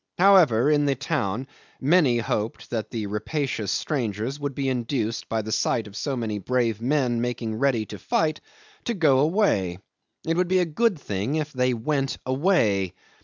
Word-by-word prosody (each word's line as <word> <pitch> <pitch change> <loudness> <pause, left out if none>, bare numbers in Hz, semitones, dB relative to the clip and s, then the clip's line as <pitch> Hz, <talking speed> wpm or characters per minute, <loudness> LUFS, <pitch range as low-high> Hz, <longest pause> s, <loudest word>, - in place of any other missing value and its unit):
However, 165 - +5
in 145 -1 +3
the 140 - +2
town 130 - -2 0.3
many 145 -4 +4
hoped 110 -1 -3
that 115 -3 -2
the 110 -3 -3
rapacious 110 +2 -2
strangers 120 -1 -2
would 145 -2 -4
be 135 -1 -1
induced, 120 -3 -2
by 110 -1 -1
the 110 - -5
sight 115 +1 +1
of 105 -1 -12
so 135 +1 -2
many 110 -3 -2
brave 115 0 0
men 125 -2 +1
making 120 -2 -2
ready 120 -1 +1
to 105 -1 -9
fight, 155 - 0 0.4
to 235 - -1
go 150 -8 +4
away. 145 - +2 0.5
It 165 +1 0
would 180 0 +2
be 185 +1 +2
a 180 - +3
good 195 +5 +1
thing 105 +3 -2
if 150 -1 -2
they 125 -1 +1
went 135 +3 -1
away. 130 - +1
130 Hz, 170 wpm, -25 LUFS, 110-150 Hz, 0.5 s, However